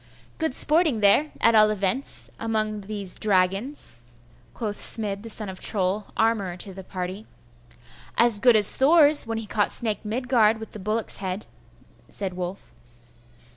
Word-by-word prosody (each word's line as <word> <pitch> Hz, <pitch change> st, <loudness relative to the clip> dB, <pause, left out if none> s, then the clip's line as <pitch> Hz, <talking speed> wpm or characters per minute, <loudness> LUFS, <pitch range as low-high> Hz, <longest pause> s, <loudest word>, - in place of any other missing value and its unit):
'Good 320 Hz, -5 st, -2 dB
sporting 305 Hz, -7 st, +2 dB
there, 205 Hz, +10 st, +3 dB
at 230 Hz, -, +3 dB
all 215 Hz, -1 st, +4 dB
events, 210 Hz, +5 st, -3 dB
among 215 Hz, -2 st, -3 dB
these 200 Hz, -2 st, -4 dB
dragons,' 195 Hz, -, 0 dB, 0.6 s
quoth 210 Hz, -3 st, -5 dB
Smid 205 Hz, -3 st, 0 dB
the 230 Hz, -, -10 dB
son 215 Hz, -1 st, -1 dB
of 185 Hz, -1 st, -8 dB
Troll, 195 Hz, 0 st, +1 dB
armourer 205 Hz, -6 st, -1 dB
to 195 Hz, +1 st, -6 dB
the 190 Hz, +1 st, -11 dB
party. 185 Hz, +3 st, -7 dB, 0.9 s
'As 235 Hz, -3 st, +2 dB
good 240 Hz, +2 st, +4 dB
as 210 Hz, -2 st, +8 dB
Thor's 295 Hz, -1 st, +5 dB
when 225 Hz, 0 st, -4 dB
he 225 Hz, -, -6 dB
caught 205 Hz, 0 st, -1 dB
Snake 220 Hz, -2 st, 0 dB
Midgard 225 Hz, -1 st, 0 dB
with 220 Hz, -, -10 dB
the 215 Hz, -, -9 dB
bullock's 215 Hz, +3 st, -3 dB
head,' 190 Hz, +1 st, -6 dB, 0.6 s
said 195 Hz, -3 st, -5 dB
Wulf. 180 Hz, +1 st, -8 dB
215 Hz, 150 wpm, -23 LUFS, 195-230 Hz, 0.9 s, as